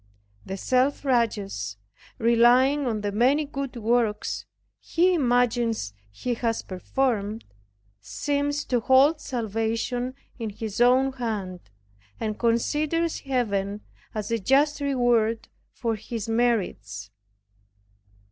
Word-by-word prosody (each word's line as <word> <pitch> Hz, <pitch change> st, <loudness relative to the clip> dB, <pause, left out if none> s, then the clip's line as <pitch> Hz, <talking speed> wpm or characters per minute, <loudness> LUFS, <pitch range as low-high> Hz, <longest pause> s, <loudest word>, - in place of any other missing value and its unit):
The 190 Hz, -, -4 dB
self 260 Hz, +7 st, +1 dB
righteous, 205 Hz, -, 0 dB, 0.4 s
relying 245 Hz, +5 st, +4 dB
on 220 Hz, -3 st, -1 dB
the 205 Hz, 0 st, -2 dB
many 260 Hz, +8 st, +3 dB
good 275 Hz, -2 st, -5 dB
works 230 Hz, -2 st, 0 dB, 0.3 s
he 360 Hz, +2 st, +2 dB
imagines 240 Hz, -, +1 dB, 0.2 s
he 170 Hz, -, -3 dB
has 230 Hz, -1 st, -1 dB
performed, 215 Hz, +2 st, -2 dB, 0.5 s
seems 285 Hz, -, -2 dB
to 245 Hz, -, +1 dB
hold 270 Hz, +6 st, +4 dB
salvation 235 Hz, +1 st, -2 dB, 0.2 s
in 225 Hz, -2 st, -3 dB
his 215 Hz, +1 st, -5 dB
own 255 Hz, +2 st, +5 dB
hand, 210 Hz, -8 st, -4 dB, 0.6 s
and 215 Hz, -1 st, -3 dB
considers 300 Hz, +8 st, +1 dB
Heaven 210 Hz, -6 st, -1 dB, 0.3 s
as 215 Hz, 0 st, -3 dB
a 230 Hz, -, +1 dB
just 285 Hz, +7 st, +2 dB
reward 240 Hz, -5 st, +1 dB, 0.3 s
of 225 Hz, -2 st, 0 dB
his 220 Hz, 0 st, -5 dB
merits. 205 Hz, -, -1 dB
235 Hz, 105 wpm, -25 LUFS, 215-265 Hz, 0.6 s, own